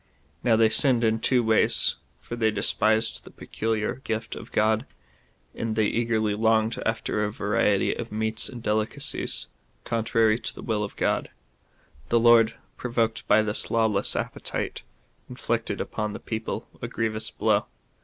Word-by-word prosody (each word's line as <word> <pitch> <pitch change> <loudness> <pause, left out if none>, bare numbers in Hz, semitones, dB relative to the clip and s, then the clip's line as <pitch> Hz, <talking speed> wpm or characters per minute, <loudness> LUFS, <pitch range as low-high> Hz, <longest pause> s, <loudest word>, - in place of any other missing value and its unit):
Now 120 -3 +4
they 110 0 +4
sinned 125 -1 +4
in 110 0 +2
two 125 +1 +2
ways, 110 -1 +3 0.2
for 120 - -7
they 115 -2 +2
despised 110 +1 +1
the - - -11
peculiar 110 +2 -3
gift 110 +1 -3
of - - -10
God, 110 +3 +1 0.7
and 115 -1 -3
they 110 -1 +2
eagerly 110 -1 0
longed 110 +1 +1
after 110 -1 -1
a 105 - -1
variety 105 -2 +1
of 120 -1 -6
meats 110 +1 -1
and 120 -3 -9
delicacies, 110 0 -1 0.4
contrary 115 -1 +1
to - - -5
the - - -9
will 110 -3 -1
of 105 - -6
God, - - 0 0.8
The 120 - +4
Lord, 115 -1 +5 0.2
pro 125 - -5
voked 115 -2 -1
by 110 +1 +5
this 105 0 +1
lawless 110 -3 +2
appetite, - - -3 0.5
inflicted - - -2
upon 105 -1 -3
the - - -6
people 110 0 -5
a - - -3
grievous 110 -1 -2
blow. - - +1
110 Hz, 155 wpm, -25 LUFS, 110-115 Hz, 0.8 s, Lord